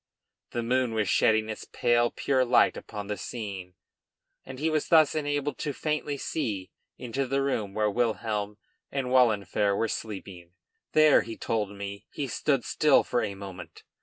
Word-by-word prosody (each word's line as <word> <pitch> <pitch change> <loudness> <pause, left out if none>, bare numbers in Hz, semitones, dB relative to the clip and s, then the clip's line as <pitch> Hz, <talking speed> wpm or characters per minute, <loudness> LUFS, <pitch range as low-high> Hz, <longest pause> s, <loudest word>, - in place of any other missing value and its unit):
The 120 - -3
moon 125 -1 +1
was 105 -2 +1
shedding 110 +3 +3
its 110 - -6
pale 120 0 +2
pure 130 -2 +1
light 125 0 +4
upon 105 -2 -7
the 105 0 -4
scene, 95 -6 -6 0.7
and 130 0 -9
he 155 +4 -1
was 155 -2 0
thus 155 -4 +5
enabled 145 -1 -2
to 145 - -2
faintly 150 0 -2
see 100 - -3 0.3
into 130 +2 -3
the 135 +1 0
room 110 -8 -2
where 105 0 +2
Wilhelm 105 -2 -1 0.3
and 135 -2 -2
Wahlenfer 105 -5 +3
were 115 - +1
sleeping. 95 -5 -7 0.4
There, 155 -1 +6
he 115 0 -7
told 105 -3 -2
me, 100 0 -7
he 145 - -3
stood 135 0 0
still 150 -2 +4
for 120 - 0
a 100 -2 -3
moment. 95 -2 -10
115 Hz, 165 wpm, -28 LUFS, 105-135 Hz, 0.7 s, There